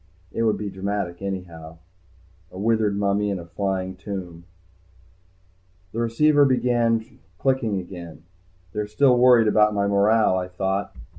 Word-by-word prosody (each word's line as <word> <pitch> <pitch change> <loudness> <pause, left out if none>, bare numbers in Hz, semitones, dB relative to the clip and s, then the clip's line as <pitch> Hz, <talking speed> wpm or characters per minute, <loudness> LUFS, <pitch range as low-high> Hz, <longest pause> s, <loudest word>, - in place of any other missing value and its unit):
It - - -3
would 110 -2 +2
be 100 0 -5
dramatic 95 -2 -4
anyhow. 85 -5 -6 0.7
A 90 - -12
withered 105 -1 +1
mummy 100 0 0
in 100 - -2
a 85 - -8
flying 95 +1 -3
tomb. 90 -3 -7 1.5
The 115 - -5
receiver 145 +6 +3
began 120 -3 +1 0.2
clicking 130 -5 0
again. 85 -3 -10 0.5
They're 105 0 -3
still 125 +5 +3
worried 120 -2 +5
about 105 0 +3
my 100 0 +1
morale, 100 -1 +3
I 90 - -4
thought. 95 +2 -3
100 Hz, 135 wpm, -23 LUFS, 95-115 Hz, 1.5 s, worried